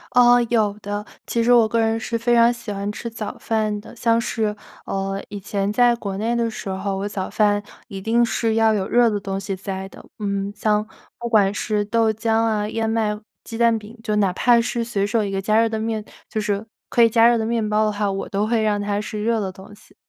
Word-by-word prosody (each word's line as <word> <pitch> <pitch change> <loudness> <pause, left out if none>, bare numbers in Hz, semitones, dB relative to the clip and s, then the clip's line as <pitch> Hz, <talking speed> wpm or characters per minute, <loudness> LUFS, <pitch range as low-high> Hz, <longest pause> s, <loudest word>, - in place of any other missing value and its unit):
哦， 245 0 +7
有 215 -4 +2
的， 205 +1 -4 0.2
其 235 - 0
实 245 +1 +5
我 230 -2 +6
个 230 +1 0
人 225 0 +1
是 230 +1 -2
非 235 +1 +1
常 235 0 +6
喜 235 -3 -6
欢 200 +1 -3
吃 220 - -7
早 220 -2 -6
饭 215 -2 -1
的。 210 - -13
像 230 0 +2
是， 220 -2 -1 0.3
呃， 195 0 -3
以 205 -1 -6
前 200 +1 -2
在 240 +2 +4
国 200 -4 -5
内 230 +3 0
的 235 -1 +1
时 220 - -7
候， 195 +1 -2
我 195 +1 -2
早 195 -2 -4
饭 205 -1 +2 0.3
一 195 -1 -6
定 230 +4 +3
是 225 -1 0
要 225 -1 +4
有 195 -2 -1
热 240 0 +4
的 210 -2 0
东 195 -1 -4
西 195 0 -4
在 190 0 -5
的。 - - -14
嗯， 200 -1 -2
像 210 0 +1 0.3
不 235 0 -4
管 205 -3 +4
是 210 -1 -1
豆 225 +1 +2
浆 225 +1 -2
啊、 215 -2 0
燕 225 0 -1
麦 215 -2 0 0.2
鸡 230 - -8
蛋 230 -1 +3
饼， 215 +2 -11
就 215 -2 -1
哪 200 -3 +2
怕 240 +5 +4
是 235 0 -1
随 210 -4 -1
手 215 +1 +1
一 200 - -2
个 195 0 -2
加 215 +3 +3
热 230 - +2
的 220 - -2
面 220 -1 -2 0.2
就 215 - -3
是 205 0 -2 0.2
可 235 - +4
以 230 - +6
加 230 +1 +5
热 240 - +4
的 220 - -1
面 230 -2 0
包 210 +1 +2
的 215 - +1
话， 205 -1 -1
我 195 0 -4
都 205 +2 0
会 225 -1 +1
让 205 -1 +1
它 205 0 -1
是 210 0 -4
热 230 0 +1
的 195 -3 -3
东 190 +2 -13
西。 210 - -22
215 Hz, 265 characters per minute, -22 LUFS, 205-230 Hz, 0.3 s, 哦